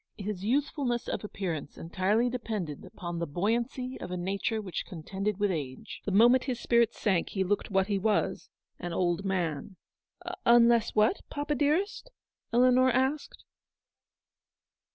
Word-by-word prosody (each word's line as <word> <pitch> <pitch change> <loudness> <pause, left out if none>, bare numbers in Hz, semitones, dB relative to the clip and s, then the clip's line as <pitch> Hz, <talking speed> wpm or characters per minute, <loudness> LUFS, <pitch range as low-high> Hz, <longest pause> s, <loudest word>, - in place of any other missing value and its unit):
His 200 -2 -4
youthfulness 255 0 0
of - - -3
appearance 175 -8 -4
82 - - -10
entirely 195 +7 +1
depended 215 - -4
upon 175 -1 -6
the 170 - -2
buoyancy 235 - -2
of - - -5
a 180 - -3
nature 195 +5 -1
which, 195 -5 -4
contended 190 +3 -4
with 205 -1 +2
age. 140 -6 -5
The 205 - -1
moment 240 +6 +5
his 250 -3 -2
spirits 235 -2 +2
sank 190 -6 +1
he 190 - -1
looked 205 +2 -1
what 190 -2 +2
he 200 -1 -1
was 210 +1 0
— - - -51
an 175 -1 -4
old 175 +1 0
man. 180 -2 -2 0.4
" - - -23 0.3
Unless 235 -1 +4
what, 215 - +3
papa, 290 +1 -2
dearest? 310 - 0 0.2
" - - -58
Eleanor 255 +2 +5
asked. 265 +4 -1
210 Hz, 155 wpm, -29 LUFS, 185-245 Hz, 0.4 s, moment